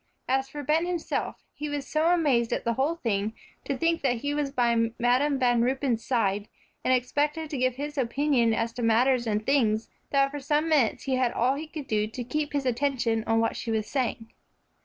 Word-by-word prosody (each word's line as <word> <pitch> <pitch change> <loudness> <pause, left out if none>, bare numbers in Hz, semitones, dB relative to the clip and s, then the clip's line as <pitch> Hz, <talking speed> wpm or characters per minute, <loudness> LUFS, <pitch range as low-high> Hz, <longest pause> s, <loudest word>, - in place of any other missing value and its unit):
As 265 +1 0
for 290 +1 -6
Ben 315 +5 +1
himself, 350 -2 -3
he 300 0 -5
was 290 -2 -3
so 310 +1 +1
amazed 290 -10 +2
at - - -1
the 235 - 0
whole 275 +7 0
thing, 215 -7 -1 0.3
to 275 - -2
think 330 +3 +1
that 250 -3 +1
he 285 0 -1
was 295 -1 -1
by 235 -3 +2
Madam 255 +4 +2
Van 245 -2 +3
Ruypen's 250 -2 0
side, 210 -4 0 0.4
and - - +1
expected 290 +5 0
to 285 - -2
give 255 0 +1
his 290 +2 -4
opinion 255 -1 +2
as 230 +1 -1
to 245 - -5
matters 240 +2 +3
and 215 0 -1
things, 230 -6 +1 0.2
that 275 -1 +2
for 290 - -5
some 295 +3 0
minutes 290 -8 +2
he 265 -2 0
had 255 -2 +2
all 250 +3 +2
he 300 +3 -5
could 310 -2 -7
do 215 -3 0
to 245 +3 -6
keep 295 +4 -3
his 285 -2 -1
attention 240 -3 0
on 225 0 +3
what 225 - 0
she 235 - -5
was 220 -1 0
saying. 235 -3 -3
260 Hz, 210 wpm, -27 LUFS, 230-290 Hz, 0.4 s, Van